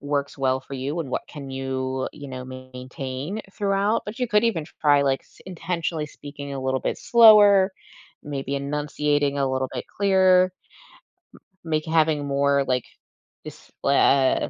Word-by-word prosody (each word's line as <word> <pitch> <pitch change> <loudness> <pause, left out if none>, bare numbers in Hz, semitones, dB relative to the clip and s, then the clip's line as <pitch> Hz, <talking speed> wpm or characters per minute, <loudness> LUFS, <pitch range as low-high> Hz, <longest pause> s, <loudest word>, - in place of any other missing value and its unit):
works 145 0 -3
well 130 -1 +1
for - - -15
you 135 +5 -3
and 145 -5 -6
what - - -2
can 140 -3 -9
you, 130 0 -3
you 145 -2 -10
know, 130 -1 -7
maintain 130 +7 -7
throughout 200 +2 0
but 210 +4 -7
you 250 - 0
could 210 0 +3
even 180 -10 0 0.2
try, 145 -1 +4
like, 135 -1 +1
s - - -25
intentionally 170 -3 -3
speaking 145 -1 -9
a 135 - -4
little 130 0 -1
bit - - -2
slower, 210 -4 +6 0.5
maybe 140 -2 -4
enunciating 145 0 -1
a 135 -1 +1
little 130 0 -1
bit 125 - -4
clearer, 190 -2 +5 1.2
m 165 - -8
make 155 0 0
having 160 -2 +1
more, 140 0 +2
like, 125 -2 -1 0.6
this - - -12
blah 140 -1 +3
145 Hz, 155 wpm, -24 LUFS, 135-170 Hz, 1.2 s, slower